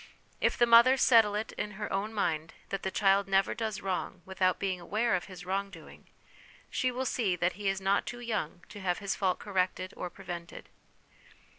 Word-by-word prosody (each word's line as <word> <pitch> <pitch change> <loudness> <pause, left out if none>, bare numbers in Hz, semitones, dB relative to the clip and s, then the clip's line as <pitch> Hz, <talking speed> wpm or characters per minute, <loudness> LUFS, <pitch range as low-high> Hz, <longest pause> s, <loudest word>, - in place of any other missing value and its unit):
If - - +1
the 240 - +5
mother 235 +3 +7
settle 225 -5 +5
it 215 +1 -3
in 210 0 -3
her 210 +2 -5
own 200 +3 -1
mind 165 -7 -2
that 195 -1 -3
the 190 - -2
child 195 0 +3
never 195 0 +2
does 220 -3 -3
wrong 185 -1 -3
without 185 -1 +1
being 190 -2 -2
aware 215 +7 0
of 180 - 0
his 180 -2 -10
wrong 195 +2 -1
doing, - - -14 0.6
she 255 - +1
will 255 +1 -3
see 210 -8 0
that 175 +1 0
he 200 +1 -2
is 195 0 -1
not 195 +1 +1
too 240 - -5
young 210 -8 -3
to 205 - -9
have 180 -2 0
his 200 -1 -2
fault 185 -3 +1
corrected 185 -1 -1
or 180 - -5
prevented. 175 -2 -8
195 Hz, 195 wpm, -30 LUFS, 185-215 Hz, 0.6 s, mother